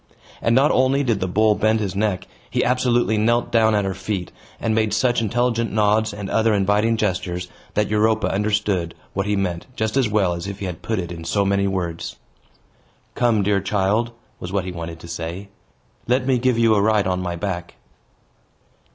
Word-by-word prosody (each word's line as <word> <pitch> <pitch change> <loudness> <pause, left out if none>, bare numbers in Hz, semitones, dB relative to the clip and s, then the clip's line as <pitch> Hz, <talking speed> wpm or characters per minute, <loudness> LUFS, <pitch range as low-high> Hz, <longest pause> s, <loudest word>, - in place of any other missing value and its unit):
And 115 - +2
not 140 +3 +5
only 130 +2 +3
did 115 -6 +1
the 95 - -1
bull 105 +4 +3
bend 110 +1 +2
his 100 -3 -2
neck, 100 -3 0 0.2
he - - 0
absolutely 120 -3 +2
knelt 120 +2 +1
down 110 -2 +4
at 105 -1 +1
her 95 - -1
feet, 95 -1 -4 0.3
and 110 - 0
made 110 -1 +1
such 120 +2 +2
intelligent 115 +1 0
nods, 110 +1 +2
and 100 -1 -6
other 110 +1 +2
inviting 105 +3 +2
gestures, 90 -3 -2 0.3
that 105 -1 +2
Europa 110 0 +2
understood 100 -4 0 0.2
what 100 +1 -1
he 105 - +1
meant 90 -3 -2
just 110 +1 -1
as 130 -5 +2
well 100 -4 +2
as 85 +2 -5
if 100 -1 -5
he 100 - -5
had 90 -2 -5
put 110 - -2
it 90 -2 -3
in 85 -1 -7
so 100 +4 0
many 100 0 +2
words. 90 -4 -3 1.0
"Come, 115 -4 +2
dear 100 0 +2
child," 100 +4 +1 0.3
was 90 - -6
what 100 -2 -1
he 90 - -4
wanted 85 -1 -7
to - - -10
say, 85 +4 -6 0.6
"let 125 +2 +2
me 130 -2 +2
give 125 -1 +2
you 115 -1 +4
a 105 - +3
ride 105 -1 +3
on 90 -1 0
my 90 -1 -3
back." 85 -1 -4
105 Hz, 195 wpm, -22 LUFS, 95-110 Hz, 1.0 s, not